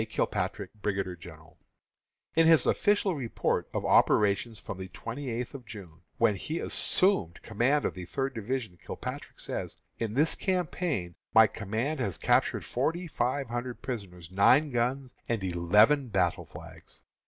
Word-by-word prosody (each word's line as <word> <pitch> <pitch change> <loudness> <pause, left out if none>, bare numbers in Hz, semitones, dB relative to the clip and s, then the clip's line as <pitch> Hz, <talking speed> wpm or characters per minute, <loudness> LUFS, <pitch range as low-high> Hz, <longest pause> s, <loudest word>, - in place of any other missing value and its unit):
KILPATRICK, 110 - -2
Brigadier 95 -3 -2
General. 80 -2 -14 0.8
In 165 0 +5
his 160 -5 +6
official 205 -2 +2
report 130 -7 -1
of - - -3
operations 105 +2 +3
from 95 - -7
the 95 - -5
twenty 120 +8 -6
eighth 120 +1 -4
of 135 -3 -8
June, 100 -8 -11 0.2
when 115 -2 +4
he 155 - -3
assumed 180 - +1
command 125 +7 +1
of - - 0
the 90 -1 -7
Third 135 +8 -2
division, 110 -5 -4
Kilpatrick - - -7
says: - - -4 0.2
"In 115 -1 -2
this 150 +4 +3
campaign 170 - -1 0.2
my 110 0 +9
command 110 +8 -3
has 100 -10 -1
captured - - +2
forty 165 +8 -1
five 135 -3 -1
hundred 120 +1 -4
prisoners, 95 -9 -6
nine 130 +10 +4
guns, 125 +2 -1 0.2
and 115 -4 -1
eleven 105 +10 +4
battle 95 -5 0
flags." - - -12
115 Hz, 145 wpm, -29 LUFS, 95-140 Hz, 0.8 s, my